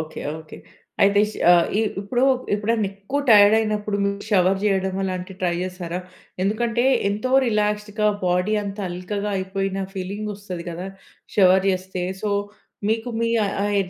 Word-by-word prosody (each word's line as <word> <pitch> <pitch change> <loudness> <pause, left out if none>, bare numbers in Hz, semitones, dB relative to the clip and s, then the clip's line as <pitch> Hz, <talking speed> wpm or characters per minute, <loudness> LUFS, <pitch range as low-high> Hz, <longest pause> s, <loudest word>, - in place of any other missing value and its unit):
Okay 160 0 -7 0.2
okay. 160 -1 -11 0.5
అయితే 200 +1 +5 0.3
ఆహ్, 175 -1 +6
ఇ - - +4 0.2
ఇప్పుడు 240 +5 -1 0.3
ఎప్పుడన్నా 215 +1 0
ఎక్కువ 200 +8 -4
టైర్డ్ 205 -1 +8
అయినప్పుడు 210 -1 -1
మీరు 200 0 -2
షవర్ 190 -1 +3
చేయడం 190 -2 +1
అలాంటివి 185 0 -4
ట్రై 175 -1 +2
చేసారా? 180 -1 -4 0.4
ఎందుకంటే 230 +4 0 0.2
ఎంతో 210 +5 -2 0.2
రిలాక్స్డ్‌గా 210 -1 0 0.2
బాడీ 180 +4 +1
అంత 200 +1 -6
అల్కగా 200 +4 -3
అయిపోయిన 195 0 -2
ఫీలింగ్ 200 +3 -4
వస్తది 185 -4 -7
గదా! 175 +3 -6 0.5
షవర్ 190 -1 +5
చేస్తే. 185 -1 -3 0.2
సో 210 - -1 0.6
మీకు 225 +2 -1
మీ 230 - +1
ఆ! - - 0 0.2
ఆహ్, 205 0 0
200 Hz, 140 wpm, -22 LUFS, 185-210 Hz, 0.6 s, టైర్డ్